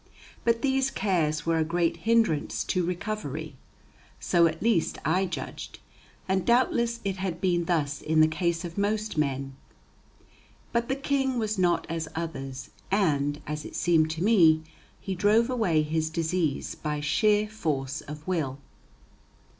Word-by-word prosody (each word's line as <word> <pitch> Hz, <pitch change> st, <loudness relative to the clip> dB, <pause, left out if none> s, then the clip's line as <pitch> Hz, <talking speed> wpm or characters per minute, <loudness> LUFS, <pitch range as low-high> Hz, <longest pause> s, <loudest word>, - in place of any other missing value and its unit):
But 230 Hz, 0 st, +1 dB
these 270 Hz, -1 st, +2 dB
cares 165 Hz, -7 st, 0 dB
were 165 Hz, -1 st, +2 dB
a -, -, +3 dB
great 170 Hz, +1 st, 0 dB
hindrance 215 Hz, -5 st, +1 dB
to 185 Hz, -2 st, 0 dB
recovery. 170 Hz, -5 st, -4 dB, 0.6 s
So 170 Hz, -1 st, +4 dB
at 160 Hz, 0 st, -4 dB
least 220 Hz, -8 st, +2 dB
I 185 Hz, +4 st, +2 dB
judged, 180 Hz, -, -6 dB, 0.5 s
and 190 Hz, -1 st, +1 dB
doubtless 235 Hz, -1 st, +2 dB
it 195 Hz, -1 st, -1 dB
had 185 Hz, -3 st, -3 dB
been 175 Hz, -2 st, +1 dB
thus 150 Hz, -4 st, 0 dB
in 155 Hz, 0 st, +1 dB
the 155 Hz, -, +7 dB
case 170 Hz, +2 st, -1 dB
of 170 Hz, +3 st, -5 dB
most 215 Hz, +1 st, -1 dB
men. 135 Hz, -3 st, -1 dB, 1.2 s
But 235 Hz, 0 st, 0 dB
the 265 Hz, -, +1 dB
King 270 Hz, -2 st, 0 dB
was 215 Hz, -3 st, -1 dB
not 175 Hz, -2 st, +2 dB
as 165 Hz, -1 st, -3 dB
others, 135 Hz, -5 st, -5 dB, 0.2 s
and, 150 Hz, -7 st, +1 dB
as 150 Hz, 0 st, -4 dB
it -, -, -9 dB
seemed 160 Hz, -2 st, +3 dB
to 165 Hz, -, -1 dB
me, 165 Hz, -8 st, +5 dB, 0.4 s
he 195 Hz, -, -4 dB
drove 210 Hz, +6 st, +3 dB
away 185 Hz, -11 st, +2 dB
his 155 Hz, +1 st, -1 dB
disease 160 Hz, -2 st, -1 dB
by 150 Hz, -1 st, -3 dB
sheer 210 Hz, +7 st, +2 dB
force 150 Hz, -10 st, -3 dB
of 150 Hz, +1 st, -9 dB
will. 155 Hz, -8 st, -1 dB
170 Hz, 150 wpm, -27 LUFS, 155-210 Hz, 1.2 s, the